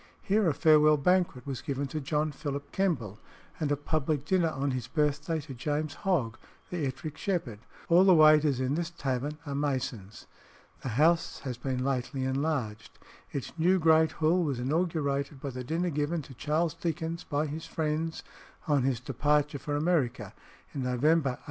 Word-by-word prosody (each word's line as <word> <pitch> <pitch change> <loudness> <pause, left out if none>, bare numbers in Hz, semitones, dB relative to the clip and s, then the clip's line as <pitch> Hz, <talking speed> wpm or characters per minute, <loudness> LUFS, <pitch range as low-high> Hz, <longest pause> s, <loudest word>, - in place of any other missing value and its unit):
Here 205 -2 +2
a - - +1
farewell 155 -1 +5
banquet 175 -4 +1
was 135 -3 -4
given 140 0 -2
to 155 +3 -3
John 150 +2 0
Philip 145 -1 -5
Kemble, 125 - -1 0.4
and 150 -3 -1
a 145 - +2
public 145 -1 -1
dinner 175 -1 +2
on 140 -2 -2
his 125 -3 -3
birthday, 150 +3 0
to 140 -1 -9
James 145 +4 -2
Hogg, 135 - -1 0.3
the 165 -6 -1
Ettrick 145 +3 -6
Shepherd. 165 - -2 0.3
All 175 +2 +6
the 190 -2 +6
waiters 155 -3 +6
in 130 +1 0
this 170 +2 -1
tavern 140 -2 -3
are 140 - -4
Masons. 130 -8 -3 0.6
The 130 - -4
house 165 +3 +2
has 130 -4 -5
been 130 0 -2
lately 135 0 -1
enlarged. 130 -5 -2 0.3
Its 140 - -5
new 180 +4 +4
great 160 -1 +4
Hall 165 +3 +2
was 140 -5 -1
inaugurated 140 -1 -1
by 140 0 -5
the 125 0 -6
dinner 170 +6 -1
given 150 +2 -1
to 135 - -12
Charles 155 +6 0
Dickens 165 0 -3
by 145 +1 -1
his 155 +2 -6
friends 160 0 -2 0.4
on 145 -3 +3
his 130 -2 0
departure 145 +3 0
for 145 +1 -3
America 150 -5 0 0.4
in - - -4
November 130 +2 +2
1857. - - -25
150 Hz, 170 wpm, -29 LUFS, 135-160 Hz, 0.6 s, All